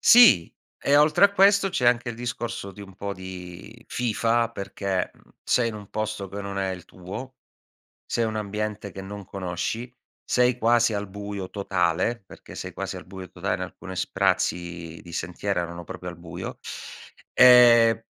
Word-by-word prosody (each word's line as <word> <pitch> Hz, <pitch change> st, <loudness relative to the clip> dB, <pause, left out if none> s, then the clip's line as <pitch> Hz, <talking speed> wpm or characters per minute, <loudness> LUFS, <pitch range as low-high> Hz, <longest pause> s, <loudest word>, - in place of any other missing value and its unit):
Sì 225 Hz, -, +7 dB, 0.3 s
e 140 Hz, +1 st, +3 dB
oltre 150 Hz, +6 st, +5 dB
a 200 Hz, -, +5 dB
questo 200 Hz, 0 st, +5 dB
c'è 125 Hz, -9 st, 0 dB
anche 120 Hz, 0 st, +1 dB
il -, -, -6 dB
discorso 120 Hz, -3 st, -4 dB
di 100 Hz, -, -13 dB
un 95 Hz, -1 st, -11 dB
po' 100 Hz, +1 st, -4 dB
di 95 Hz, +4 st, -10 dB
fifa, 115 Hz, -1 st, +1 dB
perché, 100 Hz, -2 st, -2 dB
mhmm, -, -, -25 dB
sei 120 Hz, -2 st, +2 dB
in 115 Hz, -, -5 dB
un 105 Hz, -2 st, -10 dB
posto 110 Hz, -2 st, -3 dB
che 100 Hz, +2 st, -6 dB
non 100 Hz, 0 st, -5 dB
è 95 Hz, -1 st, 0 dB
il 90 Hz, -2 st, -6 dB
tuo, 95 Hz, +9 st, -8 dB, 0.7 s
sei 120 Hz, -, 0 dB
un 110 Hz, -1 st, -2 dB
ambiente 105 Hz, -1 st, -3 dB
che 95 Hz, +1 st, -8 dB
non 100 Hz, +1 st, -8 dB
conosci, 95 Hz, +6 st, -4 dB, 0.4 s
sei 125 Hz, 0 st, +2 dB
quasi 120 Hz, -1 st, +3 dB
al 100 Hz, -1 st, -3 dB
buio 100 Hz, -1 st, -6 dB
totale 95 Hz, +3 st, 0 dB
perché -, -, -13 dB
sei -, -, -6 dB
quasi -, -, -5 dB
al -, -, -10 dB
buio 95 Hz, 0 st, -9 dB
totale 95 Hz, +2 st, -2 dB
in -, -, -10 dB
alcune 95 Hz, 0 st, -7 dB
sprazzi 85 Hz, -2 st, -1 dB
di 85 Hz, -, -12 dB
sentiero 90 Hz, +3 st, -2 dB
erano 85 Hz, 0 st, -6 dB
proprio 90 Hz, +2 st, -7 dB
al 85 Hz, -, -12 dB
buio, 85 Hz, +1 st, -7 dB, 0.8 s
ehm, 120 Hz, -3 st, +8 dB
100 Hz, 170 wpm, -25 LUFS, 95-120 Hz, 0.8 s, ehm